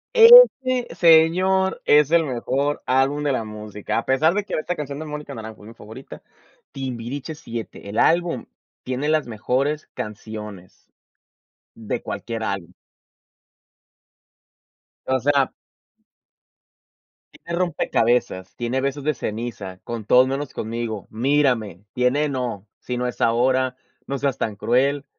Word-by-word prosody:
Ese, 450 - +8
señor, 180 +3 +4
es 150 -1 +5
el 165 0 +3
mejor 140 +2 -1
álbum 135 +3 +1
de 145 - +1
la 130 -4 -1
música, 105 0 -4
a 115 - -6
pesar 155 +6 +3
de 205 +1 -1
que - - -5
esta 170 +3 -2
canción 145 -3 -5
de 155 - -6
Mónica 150 -1 -7
Naranjo 110 -1 -9
es - - -12
mi 115 - -11
favorita, 110 +5 -12 0.5
Timbiriche 130 +3 -5
VII, 115 -2 -5 0.2
el 105 +3 -3
álbum 170 -6 +2 0.4
tiene 130 +3 -3
las 155 -2 +1
mejores 130 +7 -1
canciones 105 -3 -8 0.8
de 110 -2 -5
cualquier 110 +2 -5
álbum. 95 -4 -4 2.3
O 130 0 +1
sea 140 +1 +2 1.8
tiene 170 +1 -6
Rompecabezas, 120 - 0
tiene 120 +2 -2
Besos 140 +1 -2
de 155 +2 +1
ceniza, 105 -6 -6
Con 115 -3 -6
todos 125 +4 +5
menos 135 +1 -4
conmigo, 110 -2 -4
Mírame. 115 - 0
Tiene 125 +4 +1
No, 120 -7 -4
Si 125 - -5
no 125 0 -1
es 125 - -6
ahora, 130 +2 +2 0.3
No 140 - -2
seas 135 -1 -1
tan 110 -5 -2
cruel, 135 +7 +1
130 Hz, 130 wpm, -22 LUFS, 115-150 Hz, 2.3 s, Ese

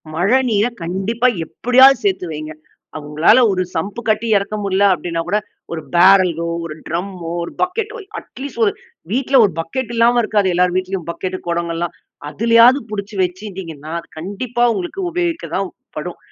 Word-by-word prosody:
மழநீரை 220 +4 +2
கண்டிப்பா 195 +8 0 0.2
எப்படியாவது 255 +6 +5
சேத்து 190 -2 0
வையுங்க. 155 0 -6 0.4
அ - - -3
உங்களால 155 +11 +4
ஒரு 185 -1 0
சம்ப் 200 +8 -3
கட்டி 215 +1 +1
இறக்க 200 +2 -3
முடில 195 0 +1
அப்டின்னா 170 -1 -3
கூட 205 +4 +1 0.3
ஒரு 165 - -4
பேரலோ, 175 -2 +5 0.2
ஒரு 155 -2 -6
ட்ரம்மோ, 175 0 -4
ஒரு 170 - -6
பக்கெட்டோ, 425 +6 -2 0.2
அட் - - -20
லீஸ்ட் 265 -4 -5
ஒரு 200 - +2 0.4
வீட்டில 265 +2 +3
ஒரு 195 - -1
பக்கெட் 240 +8 -3
இல்லாம 235 +1 +4
இருக்காது. 205 -3 +1
எல்லோர் 180 0 +2
வீட்லயும். 185 -2 -3
பக்கெட்டு 185 +2 -4
குடங்கள்லாம், 170 0 -2 0.4
அதிலயாவது 230 - +5
புடிச்சு 205 0 -5
வெச்சுருந்தீங்கன்னா, 180 -5 -6
அது - - -14
ந - - -20
கண்டிப்பா 220 +8 -3
உங்களுக்கு 375 +2 -4
உபயோகிக்க 345 -1 -2
தான் - - -1 0.3
படும். - - -5
195 Hz, 155 wpm, -18 LUFS, 170-240 Hz, 0.4 s, எப்படியாவது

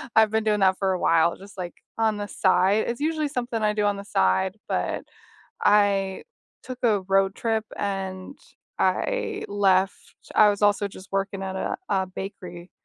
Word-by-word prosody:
I've 220 -1 +5
been 220 0 +1
doing 210 -1 +2
that 190 -1 +4
for 190 -1 +1
a 180 - -2
while 165 0 +3
just 200 +1 -14
like 175 -1 -5 0.2
on 220 -2 +1
the 205 0 -4
side. 200 +2 +2
It's 235 +4 -3
usually 310 -1 0
something 245 -4 -3
I 210 0 +2
do 210 -1 0
on 205 -1 +1
the 200 - -8
side, 185 - +1
but - - -1 0.6
I 200 -2 +3 0.4
took 255 -1 -7
a 215 -4 +3
road 195 0 +3
trip 225 -1 -1
and 195 +3 -4 0.4
I - - 0
left. 195 -1 +2 0.4
I 210 -1 +6
was 200 0 -3
also 205 0 +3
just 190 0 -13
working 195 0 -2
at 190 0 -4
a - - -2
a 190 -1 +1
bakery. 180 -2 -8
200 Hz, 175 wpm, -25 LUFS, 190-215 Hz, 0.6 s, I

